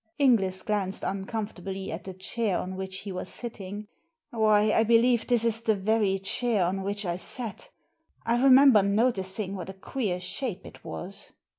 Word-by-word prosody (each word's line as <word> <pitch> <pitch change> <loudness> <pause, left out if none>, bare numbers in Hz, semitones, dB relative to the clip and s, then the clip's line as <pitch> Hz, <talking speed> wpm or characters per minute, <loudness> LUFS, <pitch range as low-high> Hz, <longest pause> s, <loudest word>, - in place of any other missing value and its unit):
Inglis 205 -9 +3
glanced 200 -2 -2
uncomfortably 195 -1 -4
at 165 - -6
the 190 -1 -7
chair 195 +1 -1
on 185 +1 -4
which 190 0 -5
he 200 - -6
was 185 0 -5
sitting. 210 -3 -6 0.4
"Why, 215 -2 +3
I 225 - +4
believe 235 +1 +3
this 235 -2 +2
is 225 0 +1
the 220 -2 +2
very 205 0 +1
chair 200 +1 0
on 190 +2 -1
which 200 +1 -3
I 175 -1 -1
sat! 230 - -3 0.6
I 235 +1 +1
remember 265 -4 +7
noticing 200 -2 0
what 185 -2 -6
a - - -6
queer 195 -1 -3
shape 190 +2 -4
it - - -13
was." 195 +3 -7
205 Hz, 165 wpm, -27 LUFS, 190-230 Hz, 0.6 s, remember